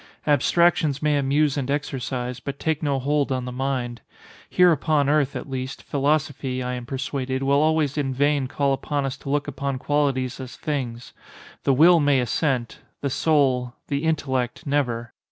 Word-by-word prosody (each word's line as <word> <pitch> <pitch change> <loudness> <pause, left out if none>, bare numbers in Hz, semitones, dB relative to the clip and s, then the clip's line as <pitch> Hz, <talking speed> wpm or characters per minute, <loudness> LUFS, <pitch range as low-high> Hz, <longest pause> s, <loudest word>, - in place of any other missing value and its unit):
Abstractions 150 0 +3
may 150 -1 +3
amuse 145 +1 +2
and 135 -1 -2
exercise, 130 -3 -3
but 140 +1 -6
take 160 0 -1
no 145 -3 0
hold 140 +1 0
on 130 -1 -1
the 125 - -5
mind. 125 -2 -3 0.5
Here 180 -1 +5
upon 150 -2 +2
earth, 145 -2 +2
at - - -5
least, 130 0 -5
philosophy, 140 -3 -1
I 125 0 -3
am 125 -1 -6
persuaded, 135 -1 -3
will 140 +1 +3
always 155 -2 +1
in 135 -2 -1
vain 140 0 +1
call 140 +1 0
upon 140 +1 -2
us 135 - -3
to - - -9
look 145 +1 0
upon 140 -1 -3
qualities 135 -2 0
as 130 -1 -7
things. 125 -5 -4 0.5
The 135 - +4
will 170 +5 +7
may 145 -3 +3
assent—the 130 +1 -2
soul—the 140 -1 0
intellect, 135 -3 -1
never. 125 -5 -1
140 Hz, 160 wpm, -24 LUFS, 130-145 Hz, 0.5 s, will